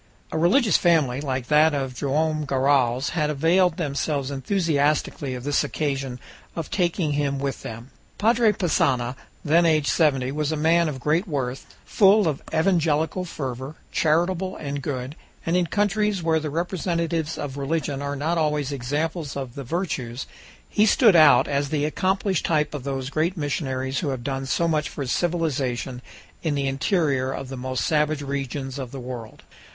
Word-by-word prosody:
A - - -2
religious 205 - +4
family, 150 -7 +2
like 130 -3 -2
that 150 +2 +4
of 135 -2 -2
Joam 155 +4 0
Garral's, 135 -2 +2
had 155 -3 0
availed 165 +4 +2
themselves 145 -3 -2
enthusiastically 145 -3 0
of 125 - -7
this 145 +1 +1
occasion 135 -4 -3 0.4
of 165 -3 -5
taking 175 -4 0
him 145 -1 0
with 135 -1 -3
them. 115 +3 -8 0.3
Padre 225 +1 +4
Passanha, 130 -10 +1 0.3
then 165 +3 +4
aged 155 -3 +3
seventy, 135 -5 +2
was 150 +1 -1
a - - 0
man 165 +2 +3
of 135 -3 -5
great 160 - +1
worth, 135 -5 -4
full 200 -1 +5
of 150 -3 -1
evangelical 160 0 +1
fervor, 135 -3 -5 0.2
charitable 175 +4 +1
and 140 -1 -4
good, 130 0 -4 0.3
and 165 - +1
in 180 -1 +2
countries 205 0 0
where 160 -1 +2
the 155 -1 -4
representatives 170 -1 -2
of 140 -2 -5
religion 140 -1 -2
are 140 0 -3
not 160 +4 0
always 150 -3 0
examples 145 +4 -3
of 130 -3 -5
the 140 - -6
virtues, 130 -5 -3 0.4
he 215 +1 +3
stood 215 -2 +5
out 155 -3 +7
as 140 0 -1
the 150 -1 0
accomplished 190 +3 0
type 150 -2 +1
of 145 -4 -5
those 135 -1 -3
great 165 +5 0
missionaries 135 -3 -2
who 155 - -2
have 130 -3 -4
done 135 0 -3
so 170 +5 +1
much 155 -2 0
for 140 - -5
civilization 135 -6 -1 0.4
in 155 -3 -1
the 140 -1 0
interior 135 -2 +1
of 135 0 -5
the 135 - -5
most 130 0 -2
savage 150 -1 +1
regions 135 -1 -4
of 130 -3 -5
the 135 - -7
world. 120 -3 -8
150 Hz, 165 wpm, -24 LUFS, 135-165 Hz, 0.4 s, out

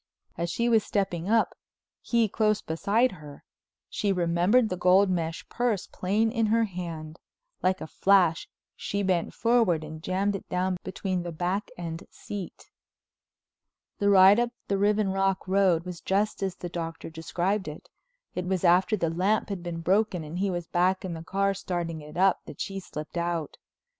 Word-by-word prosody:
As 170 +1 -2
she 235 +7 0
was 225 -3 +4
stepping 190 -3 -2
up, 225 0 +3 0.5
he 235 -2 +2
close 215 0 +1
beside 210 +10 +1
her, 150 -5 -12 0.4
she 205 - -1
remembered 180 +6 +3
the 185 - -1
gold 185 +2 +4
mesh 165 -2 -2
purse 235 -5 -1
plain 210 +4 0
in 225 -2 +1
her 230 +2 +3
hand. 170 -5 -6 0.4
Like 185 +1 +1
a - - -4
flash 180 -1 +3 0.3
she 200 0 -3
bent 180 -3 0
forward 230 -9 +2
and 155 0 -8
jammed 195 +4 0
it 195 - -8
down 185 0 0
between 190 -1 -2
the 175 0 -5
back 180 +5 -2
and 165 -1 -5
seat. 200 -4 -8 1.3
The 205 -1 +3
ride 195 +2 +7
up 240 0 +1 0.2
the 200 -1 0
Riven 205 0 +2
Rock 195 0 0
Road 185 -3 +3
was 180 -2 -7
just 200 +3 0
as 190 -2 -1
the 175 - -6
Doctor 165 -1 -6
described 175 +5 -2
it. 150 0 -8 0.5
It 180 0 -3
was 185 -1 -1
after 185 +4 +4
the 165 -4 0
lamp 190 +7 +1
had 195 -3 -4
been 170 -1 -5
broken 190 0 +1
and 155 +4 -6
he 200 +1 +1
was 175 -2 -3
back 185 +3 +1
in 180 - -4
the 165 - -6
car 195 +3 0
starting 175 -4 -4
it 150 +2 -10
up, 190 0 +4
that 145 - -11
she 195 0 -3
slipped 155 -3 -7
out. 170 -3 -2
185 Hz, 175 wpm, -27 LUFS, 170-200 Hz, 1.3 s, ride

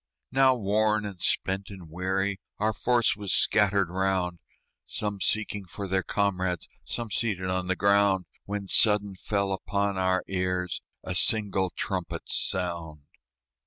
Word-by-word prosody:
Now 135 0 +5
worn 105 -1 +1
and 95 -4 -7
spent 95 +1 0
and 95 -4 -10
weary, 95 +4 -1 0.2
Our 110 +1 +1
force 120 +2 +2
was 100 -2 -4
scattered 100 -3 +3
round, 95 -2 0 0.4
Some 105 -2 -3
seeking 105 -2 -1
for 100 +2 -6
their 95 0 +1
comrades, 95 -4 -1 0.2
Some 115 -2 -4
seated 95 -5 -1
on 90 0 -1
the 95 - +1
ground, 100 -1 +3 0.2
When 100 -1 -4
sudden 105 -1 +4
fell 100 +1 -1
upon 100 0 -1
our 95 0 +2
ears 90 -2 -2 0.2
A 90 - -3
single 95 -1 +4
trumpet's 90 -1 -4
sound. 85 -5 -2
95 Hz, 135 wpm, -27 LUFS, 95-105 Hz, 0.4 s, Now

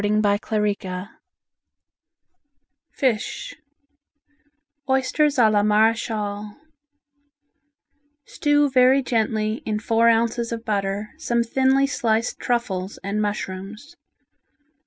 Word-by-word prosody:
FISH 265 - -2 1.4
Oysters 270 +3 +1
a 235 -3 +6
la 210 -1 +3
Marechale 210 -1 0 1.7
Stew 290 0 +2
very 260 +1 +4
gently 220 -2 -1
in 215 -1 -2
four 230 +1 +2
ounces 230 +1 +1
of 230 0 -5
butter 200 0 -2
some 235 -6 0
thinly 265 +3 +2
sliced 230 -4 -1
truffles 205 -6 -2
and 200 +2 -2
mushrooms. 210 - -5
225 Hz, 75 wpm, -22 LUFS, 210-255 Hz, 1.7 s, a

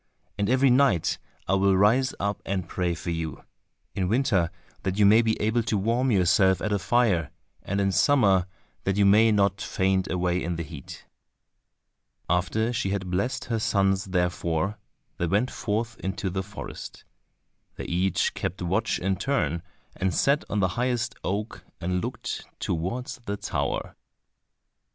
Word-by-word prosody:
And 100 0 -1
every 130 +1 +4
night 125 - +3 0.3
I 95 - +1
will 95 0 +3
rise 120 +7 +3
up 100 0 -2
and 95 -3 -2
pray 90 0 -1
for 85 - -4
you—in 80 +3 -6
winter 105 -8 +2 0.3
that 95 0 -2
you 105 - +5
may 110 +3 +7
be 110 -1 0
able 110 +3 +1
to 110 -1 0
warm 115 +6 +1
yourself 95 -2 +4
at 105 - -1
a 100 - +1
fire, 100 -8 +2 0.3
and 100 +1 -2
in 100 -1 +2
summer 95 - +4 0.4
that 95 0 0
you 100 - +4
may 110 +3 +6
not 100 -2 +2
faint 95 0 0
away 90 0 0
in 85 0 -2
the 85 - -3
heat." 70 -3 -10 1.2
After 95 +7 +1
she 105 -4 -1
had 95 -2 -2
blessed 120 +8 -1
her 115 -3 -1
sons 95 -2 +1
therefore, 90 0 -1 0.4
they 85 - 0
went 105 +9 +1
forth 115 +2 -2
into 95 0 -3
the 95 +1 -1
forest. 105 +2 -8 0.7
They - - -6
each 90 +1 +1
kept 90 +1 -4
watch 100 +5 0
in 95 +1 -1
turn, 85 - 0 0.3
and 95 -3 -1
sat 140 +2 +3
on 105 - 0
the 95 - +2
highest 120 +2 -1
oak 105 +4 -3 0.2
and 90 +1 -1
looked - - -4 0.2
towards 115 +10 -3
the 100 0 -3
tower. - - -3
100 Hz, 155 wpm, -26 LUFS, 90-110 Hz, 1.2 s, may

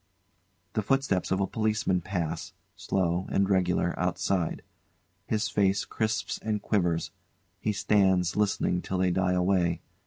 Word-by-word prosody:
] 90 0 -44
[The 110 - +1
footsteps 130 -5 +1
of 95 - +1
a 100 - +2
Policeman 110 -3 0
pass, 90 -4 -3 0.2
slow 90 -1 -1
and 100 0 +2
regular, 90 -2 +1
outside. 90 -1 -1 0.6
His 110 0 0
face 100 -1 +1
crisps 110 -1 -2
and 110 -1 -1
quivers; 90 -6 0 0.5
he 105 - 0
stands 95 -3 +2
listening 100 -4 +1
till 95 - -3
they 90 0 +2
die 90 0 +1
away. 90 -2 +2
95 Hz, 135 wpm, -28 LUFS, 90-105 Hz, 0.6 s, a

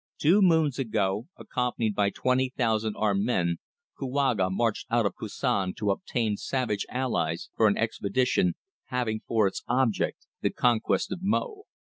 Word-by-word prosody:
Two 180 +8 +4
moons 160 -7 +3
ago, 105 -2 0
accompanied 120 -3 -1
by 100 0 +2
twenty 130 +4 0
thousand 110 -3 +1
armed 100 -2 +1
men, 85 -7 +1 0.4
Kouaga 130 -8 +1
marched 110 +4 -1
out 120 -2 +2
of 100 - 0
Koussan 95 -2 -2
to 105 -2 0
obtain 110 +1 -1
savage 125 -6 -2
allies 85 -11 -1
for 110 - +4
an 100 - +2
expedition, 110 -4 +1 0.3
having 120 -4 -1
for 110 -2 +3
its 95 - -1
object 120 -3 0 0.2
the - - +2
conquest 120 +6 +1
of 185 - -3
Mo." 410 - -1
115 Hz, 145 wpm, -27 LUFS, 100-130 Hz, 0.4 s, Two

